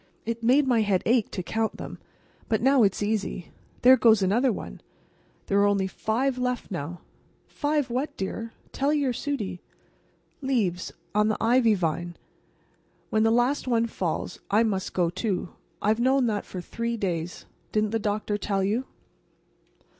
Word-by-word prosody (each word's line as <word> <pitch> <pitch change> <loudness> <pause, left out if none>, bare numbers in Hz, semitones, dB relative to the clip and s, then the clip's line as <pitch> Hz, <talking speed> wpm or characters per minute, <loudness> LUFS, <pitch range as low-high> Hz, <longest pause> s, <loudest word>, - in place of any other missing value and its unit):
It 230 +1 -3
made 260 +5 +4
my 240 -3 +3
head 200 -4 +1
ache 235 -2 +3
to 185 - -4
count 220 +3 -1
them. - - -8 0.5
But 220 0 +1
now 270 0 +5
it's 200 -1 +2
easy. 205 -4 -2 0.3
There 260 +1 +8
goes 220 -5 +5
another 235 +7 +3
one. - - -7 0.6
There 200 - +2
are 200 - +5
only 200 -1 +2
five 245 +7 -1
left 250 -3 -2
now." 170 0 -5 0.4
"Five 290 -3 -1
what, 260 +5 -2
dear. 225 +4 -4 0.2
Tell 280 +2 0
your 280 -4 +1
Sudie." 235 -9 -3 0.8
"Leaves. 215 -10 0 0.2
On 210 +1 +3
the 215 - 0
ivy 230 -1 +4
vine. 175 -1 -2 1.0
When 215 - +2
the 225 - +4
last 245 +5 +2
one 230 -2 +2
falls 185 -6 -3
I 210 +3 +4
must 205 -3 -2
go, 175 -2 +2
too. 185 -1 -2 0.3
I've 215 +2 +2
known 260 +1 +3
that 210 -3 -1
for 180 - -6
three 230 +5 -3
days. 175 -4 -3 0.3
Didn't 215 -1 +1
the 225 - 0
doctor 210 0 -1
tell 195 -2 0
you?" 220 +7 0
220 Hz, 160 wpm, -26 LUFS, 195-245 Hz, 1.0 s, There